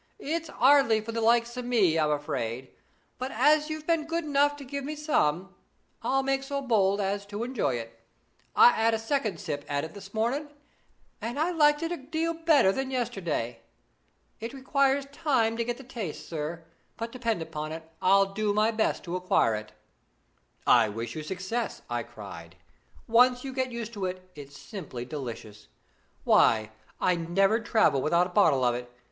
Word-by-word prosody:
'It's 330 -3 -3
'ardly 260 -4 +5
for 220 +1 -6
the 230 0 -2
likes 235 +1 +3
o' 250 - -3
me, 215 -10 +2
I'm 155 -1 +2
afraid; 130 -4 -3 0.5
but 255 +1 -3
as 300 +2 +3
you've 310 0 -5
been 330 -2 +1
good 335 +1 -1
enough 290 0 +2
to 290 - -10
give 280 +2 -5
me 300 +3 -4
some, 190 - 0 0.5
I'll 270 0 +1
make 270 0 0
so 280 +1 -3
bold 210 -7 +2
as 200 0 -1
to 205 +2 -4
enjoy 235 - -1
it. 115 -1 -7 0.6
I 245 - +8
'ad 225 0 +3
a - - 0
second 225 -1 -1
sip 150 -7 -4
at 145 0 -1
it 160 - -7
this 195 -1 -11
morning, 245 +8 -1 0.7
and 240 +4 -4
I 330 +3 +1
liked 295 -2 +3
it 330 - -2
a 350 - -2
deal 320 +4 -2
better 320 - +4
than 265 +5 -3
yesterday. 175 - -2 0.8
It 230 +3 -6
requires 275 +1 +1
time 265 -7 +1
to 235 - 0
get 240 +1 -3
the 270 - -11
taste, 225 - -6
sir; 160 +1 -5 0.3
but, 230 0 -4
depend 230 -8 -2
upon 155 -1 -6
it, 160 0 -7
I'll 195 +1 +4
do 210 0 0
my 215 +2 +3
best 220 -1 0
to 175 0 -4
acquire 180 -11 +2
it.' 105 0 -5 0.9
'I 115 -3 +5
wish 115 +2 -5
you 155 - -4
success!' 190 +8 -4
I 120 0 0
cried. 100 -8 -10 0.5
'Once 250 +2 +4
you 270 -1 -5
get 260 -1 -1
used 235 -1 -5
to 200 -3 -3
it, 185 0 -5
it's 145 -1 -11
simply 150 - -7
delicious. 115 -6 -7 0.6
Why, 110 -1 +4 0.3
I'd 170 -2 0
never 195 +5 +3
travel 215 - +2
without 170 +5 +3
a 180 - -7
bottle 155 -10 +4
of 120 -1 +3
it. 120 0 -6
220 Hz, 180 wpm, -28 LUFS, -, 0.9 s, I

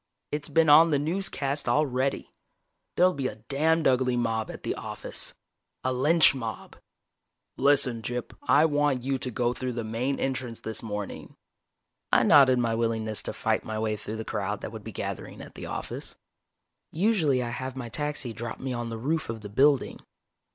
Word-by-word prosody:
"It's 150 0 -2
been 165 -1 +3
on 155 +3 +8
the 145 - +3
newscast 145 -4 -1
already. 135 0 0 0.6
There'll 180 +1 +4
be 135 -2 -2
a 105 - -5
damned 150 +9 +1
ugly 125 -1 +2
mob 115 -2 -1
at - - -8
the - - -1
office - - -6 0.5
a 130 - 0
lynch 150 +6 +5
mob. 115 -5 -6 0.8
Listen, 135 -4 +3
Gyp, 120 +2 -4
I 140 +5 +4
want 145 -4 +1
you 135 0 -1
to 125 - -2
go 120 0 0
through 125 0 -4
the 120 -1 -3
main 120 +5 -2
entrance 130 -3 -3
this 110 - -4
morning." 105 -3 -6 0.8
I - - +5
nodded 130 -3 +6
my 120 -2 +1
willingness 115 -2 0
to - - -4
fight - - 0
my 110 - -4
way 110 0 0
through 105 +1 -6
the 110 - -5
crowd 105 -1 -3
that - - -6
would 110 -2 -8
be 110 - -7
gathering - - -6
at - - -10
the - - -8
office. - - -5 0.8
Usually 160 - +2
I 120 - -3
have 130 +2 -5
my 130 -3 -5
taxi 145 -1 -2
drop 115 0 -6
me 130 -1 -3
on 120 -1 -3
the 115 - -5
roof 150 +6 -1
of 115 -1 -4
the 105 - -8
building. 135 +5 +3
125 Hz, 180 wpm, -27 LUFS, 115-145 Hz, 0.8 s, on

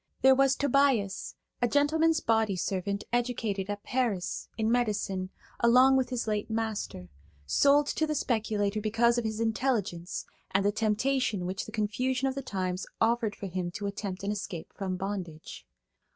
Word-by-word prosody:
There 265 0 +8
was 270 0 +4
Tobias, 270 -8 +1 0.3
a 245 - +4
gentleman's 315 +4 +3
body 220 -3 +2
servant 195 +2 -2
educated 225 -5 -1
at 205 0 -4
Paris, 225 -8 -1
in 220 0 +1
medicine, 205 -6 0 0.3
along 250 +3 +6
with 260 -2 +1
his 250 -2 -2
late 210 0 -1
master, 220 - -3 0.4
sold 285 - +4
to 315 +2 0
the 305 - -1
speculator 215 -5 0
because 235 +3 +3
of 235 - -4
his 220 0 -2
intelligence 220 -7 -1 0.2
and 195 +1 +1
the 205 - +4
temptation 220 -1 0
which 185 +2 -3
the - - -8
confusion 250 +5 0
of 265 - -1
the 275 - -4
times 185 -6 -3
offered 225 -1 +2
for - - -7
him 180 -1 -3
to 200 - -5
attempt 200 -2 -4
an 200 - -1
escape 190 -5 -5
from 190 -2 -3
bondage. 180 - -6
220 Hz, 160 wpm, -29 LUFS, 195-250 Hz, 0.4 s, There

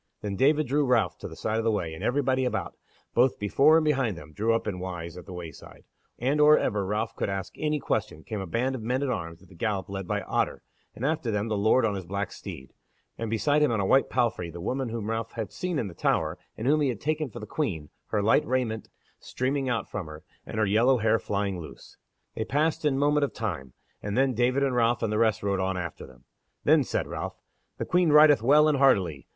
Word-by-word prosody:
Then 100 -2 -3
David 150 +7 +3
drew 145 +3 +1
Ralph 125 -4 +1
to - - -6
the - - -10
side 110 +1 -1
of - - -1
the 115 - +2
way, 90 -7 -1
and 80 - -8
everybody 130 0 +1
about, 125 - -2 0.4
both 125 +2 +3
before 140 +10 +4
and 160 - +1
behind 135 - +1
them, 80 -2 -12
drew 110 +7 +1
up 115 - -2
in 90 -3 -3
wise 90 -2 -6
at 90 - -11
the - - -9
wayside, 85 -3 -10 0.3
and 140 +5 +1
or 150 +1 +7
ever 105 -1 0
Ralph 105 +2 -2
could - - -2
ask 95 -1 -4
any 150 -1 0
question, 80 - -2
came 105 -3 -5
a 95 - -5
band 125 +9 0
of 130 - -5
men 125 +5 -1
at 135 - 0
arms 85 -5 -5
at - - -18
the - - -17
gallop 100 +1 -2
led 95 -2 -5
by - - -1
Otter, - - -1 0.3
and 125 - -4
after 155 -4 0
them 105 +1 -1
the 110 - 0
Lord 110 +4 +3
on 105 - 0
his 95 -3 -6
black 100 +1 -3
steed, 65 - -9 0.4
and 115 -1 -4
beside 130 +7 +2
him 150 -4 +3
on 110 - 0
a 100 - +1
white 135 +7 +3
palfrey 100 -8 0
the 85 +1 -9
woman 125 +7 -2
whom 110 -2 -4
Ralph 115 0 -3
had 110 -3 -4
seen 180 -3 -3
in 120 - -1
the 95 - -7
Tower, - - 0 0.2
and 110 - -5
whom 150 +3 +3
he 140 - +2
had 115 -5 -3
taken 155 -1 -1
for - - -9
the 105 - -7
Queen, 95 - -3 0.2
her 105 - 0
light 110 - +4
raiment 120 -3 -1 0.3
streaming 135 +1 -2
out 115 -5 -1
from 95 -6 -5
her, 75 0 -10 0.2
and - - -6
her 110 - +3
yellow 115 +6 +4
hair 110 0 +2
flying 100 -1 -2
loose. 80 - -11 0.4
They 110 - -2
passed 150 +6 0
in 145 -2 +3
a - - -1
moment 145 +1 +2
of - - -7
time, 65 -1 -4 0.3
and 105 +2 -3
then 135 0 +3
David 125 +4 +2
and 135 -2 +1
Ralph 120 0 +2
and 110 -1 0
the 105 - +1
rest 110 -3 +2
rode 100 -1 0
on 95 0 -1
after 85 -2 -6
them. 65 -1 -18 0.4
Then - - +5
said - - -2
Ralph: - - -5 0.4
"The - - -3
Queen 180 -1 +2
rideth 150 -4 +7
well 150 +6 +5
and 150 -3 +2
hardily." 95 - +2
115 Hz, 245 wpm, -27 LUFS, 100-135 Hz, 0.4 s, or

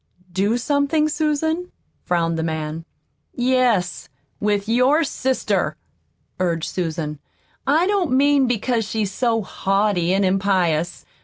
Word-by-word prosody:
"Do 205 +5 +1
something, 285 +4 +1
Susan?" 315 +3 -1 0.3
frowned 165 -1 +1
the 165 - -2
man. 160 0 -3 0.5
"Yes, 245 -7 +1 0.3
with 205 -1 0
your 255 +7 +3
sister," 265 -3 -1 0.6
urged 170 -3 0
Susan. 160 -4 -3 0.5
"I 310 +5 +4
don't 385 -6 +1
mean 280 0 +4
because 240 0 0
she's 210 -2 -2
so 225 0 0
haughty 195 -2 0
an' 195 +1 +2
impious. 185 -3 +1
215 Hz, 110 wpm, -21 LUFS, 180-275 Hz, 0.6 s, I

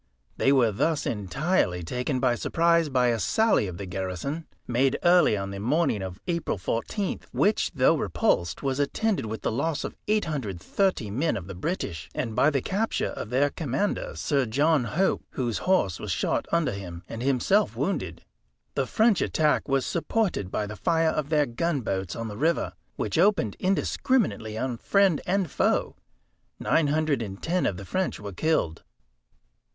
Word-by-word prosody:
They 135 - +3
were 125 -5 +4
thus 150 +9 0
entirely 105 - 0
taken 125 - -2
by 125 -2 +3
surprise 170 +5 +2
by 125 -2 +3
a 115 -1 0
sally 220 - +2
of 90 -2 -6
the 100 - -5
garrison, 95 - -4 0.2
made 130 +2 +2
early 175 - +5
on 100 0 -4
the 100 - -6
morning 125 - +1
of 95 0 -6
April 170 - -1
14th; 115 - -3
which, 210 +2 +2
though 130 +4 +4
repulsed, 85 - 0
was 135 0 -1
attended 190 - 0
with 110 +1 -5
the - - 0
loss 145 +6 -1
of - - -5
830 150 - -1
men 145 +9 0
of 95 - -6
the 100 - -7
British, 90 - -4
and 115 -3 -2
by 140 - +5
the 140 -4 -1
capture 215 +4 -1
of - - -6
their 140 +4 +2
commander, 150 +6 -2
Sir 140 -5 0
John 145 +3 +2
Hope, 180 - 0
whose 120 -4 -1
horse 100 - +2
was - - -6
shot - - 0
under 170 -6 +2
him, 90 -4 -7
and 115 - -6
himself 140 - +2
wounded. 90 - -2 0.5
The 135 - -1
French 220 - +3
attack 155 -1 +1
was 135 -1 +2
supported 175 - -1
by 105 - -2
the 105 +1 -7
fire 165 +4 +2
of 150 -2 -2
their 150 -2 +3
gunboats 115 - -2
on 115 0 -4
the 105 -1 -7
river, 160 +6 +1 0.2
which 105 - -1
opened 180 - +3
indiscriminately 185 - 0
on 125 0 -2
friend 195 - +3
and 185 -3 0
foe. - - +1 0.6
Nine 160 -3 +2
hundred 150 -3 +1
and 100 -3 -6
ten 180 +2 0
of 90 - -2
the 100 - -8
French 185 - -2
were 100 -1 -7
killed." 90 - 0
135 Hz, 170 wpm, -26 LUFS, 105-165 Hz, 0.6 s, early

